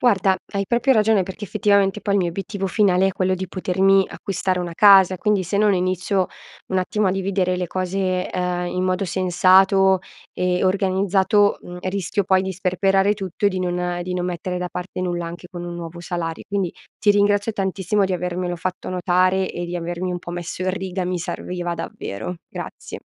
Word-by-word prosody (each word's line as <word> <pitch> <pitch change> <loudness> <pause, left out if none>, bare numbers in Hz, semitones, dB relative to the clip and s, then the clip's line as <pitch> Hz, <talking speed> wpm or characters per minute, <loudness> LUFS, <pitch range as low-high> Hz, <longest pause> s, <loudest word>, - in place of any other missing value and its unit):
Guarda, 195 -5 +3 0.2
hai 200 0 0
proprio 240 +5 +2
ragione, 215 -4 +3
perché, 190 +2 -9
effettivamente, 200 0 +2
poi, 200 -1 0
il 200 - +3
mio 175 - 0
obiettivo 195 +2 -4
finale, 190 -2 +3
è 195 - -3
quello 185 0 0
di 185 0 -5
potermi 190 +1 +2
acquistare 185 -1 -2
una 175 -1 -4
casa, 190 0 +6
quindi, 210 -1 +1
se 185 +3 -2
non 210 -1 +4
inizio, 185 +1 0 0.4
un 190 - 0
attimo, 200 +2 0
a - - +2
dividere 190 -1 0
le 180 0 -2
cose, 185 +1 -1
ehm, 180 -1 -1
in 180 +1 -2
modo 185 +1 0
sensato 190 +1 +4 0.3
e 180 0 0
organizzato, 195 +1 +2
mhmm, 175 0 -9
rischio 200 +2 -1
poi 190 0 +3
di 190 0 -3
sperperare 195 +2 +2
tutto, 195 -1 -2
e - - +6
di 185 -1 -3
non 180 -1 -2
di 180 0 -3
non 180 -1 -1
mettere 180 +1 -3
da 180 0 -3
parte 180 0 -6
nulla, 175 -2 -2
anche 175 +1 -8
con 175 -1 -7
un 175 0 -6
nuovo 170 0 -7
salari 170 -2 -4
quindi, 195 -4 -1 0.2
ti 210 - +3
ringrazio 205 +1 +3
tantissimo, 195 0 0
di 190 - -1
avermelo 180 0 -2
fatto 180 +2 -4
notare, 185 +1 +2
e 175 - -4
di 175 - -5
avermi 175 +1 -3
un 175 - -4
po' 175 - -8
messo 175 +1 -5
in 185 - +1
riga, 185 0 -3
mi 180 0 -2
serviva 175 0 -4
davvero. 110 - -6
Grazie. - - -8
185 Hz, 190 wpm, -22 LUFS, 180-195 Hz, 0.4 s, casa